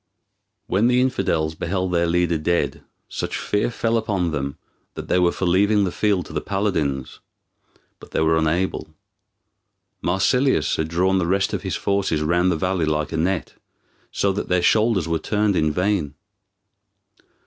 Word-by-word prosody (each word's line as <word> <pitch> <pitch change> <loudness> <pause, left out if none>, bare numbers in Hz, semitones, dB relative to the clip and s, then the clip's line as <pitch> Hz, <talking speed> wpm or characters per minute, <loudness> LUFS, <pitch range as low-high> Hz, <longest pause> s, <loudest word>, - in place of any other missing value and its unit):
When 105 +5 +2
the 125 0 +3
infidels 85 -11 0
beheld 95 +3 -2
their 85 -1 +2
leader 85 -1 +1
dead 85 +3 -1 0.3
such - - -4
fear 105 +2 0
fell 115 -1 0
upon 100 -7 -1
them 70 -2 -3 0.4
that - - -7
they 90 - +3
were 90 -1 +3
for 95 - -3
leaving 100 +4 +3
the 95 - -1
field 100 -3 0
to - - -11
the 75 - -2
paladins, 85 -10 -2 0.8
but - - -14
they - - -2
were 80 0 +3
unable. 80 0 -1 1.1
Marsilius 95 - +2
had 80 - -1
drawn 95 +3 +1
the 85 - -1
rest 95 +2 +1
of - - -2
his - - -3
forces 100 -6 0
round 90 +3 +2
the - - +1
valley 90 0 0
like 75 -1 -1
a - - -2
net, 90 +2 -1 0.6
so 100 - +1
that 100 - -4
their 90 -1 +2
shoulders 110 -6 +3
were 85 -1 0
turned 105 -2 0
in 80 -2 +2
vain. 90 -4 -1
90 Hz, 165 wpm, -22 LUFS, 80-100 Hz, 1.1 s, the